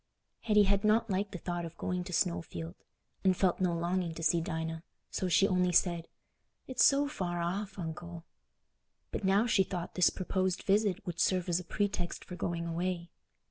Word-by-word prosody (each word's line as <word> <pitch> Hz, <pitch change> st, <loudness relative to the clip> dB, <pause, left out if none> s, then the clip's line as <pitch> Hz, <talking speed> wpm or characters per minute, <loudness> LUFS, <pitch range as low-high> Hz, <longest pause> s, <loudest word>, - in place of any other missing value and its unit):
Hetty 210 Hz, -2 st, +4 dB
had 200 Hz, +1 st, +2 dB
not 220 Hz, +1 st, +3 dB
liked 195 Hz, +2 st, -1 dB
the 190 Hz, -, -5 dB
thought 175 Hz, 0 st, -3 dB
of 170 Hz, 0 st, -8 dB
going 180 Hz, 0 st, -2 dB
to 180 Hz, -, -7 dB
Snowfield, 85 Hz, -, -1 dB, 0.5 s
and 185 Hz, -1 st, +3 dB
felt 185 Hz, -1 st, +2 dB
no 175 Hz, -2 st, +2 dB
longing 170 Hz, 0 st, -1 dB
to 165 Hz, -, -6 dB
see 165 Hz, +2 st, +3 dB
Dinah, 160 Hz, -2 st, -3 dB, 0.3 s
so 185 Hz, -, -1 dB
she 180 Hz, +3 st, +4 dB
only 180 Hz, -1 st, +2 dB
said, 170 Hz, -1 st, +2 dB, 0.6 s
"It's 250 Hz, -4 st, +2 dB
so 285 Hz, +1 st, +5 dB
far 180 Hz, -11 st, -3 dB
off, 195 Hz, +4 st, -3 dB
Uncle." 170 Hz, 0 st, -6 dB, 0.9 s
But -, -, -4 dB
now 195 Hz, +3 st, +4 dB
she 220 Hz, -5 st, +3 dB
thought 175 Hz, -2 st, -5 dB
this 180 Hz, -3 st, +4 dB
proposed 185 Hz, -1 st, -1 dB
visit 205 Hz, -2 st, +1 dB
would 170 Hz, -2 st, -5 dB
serve 185 Hz, 0 st, +2 dB
as 175 Hz, 0 st, +2 dB
a -, -, -7 dB
pretext 190 Hz, -1 st, -2 dB
for 180 Hz, -, -7 dB
going 170 Hz, -1 st, -2 dB
away. 170 Hz, 0 st, -2 dB
180 Hz, 180 wpm, -31 LUFS, 170-195 Hz, 0.9 s, so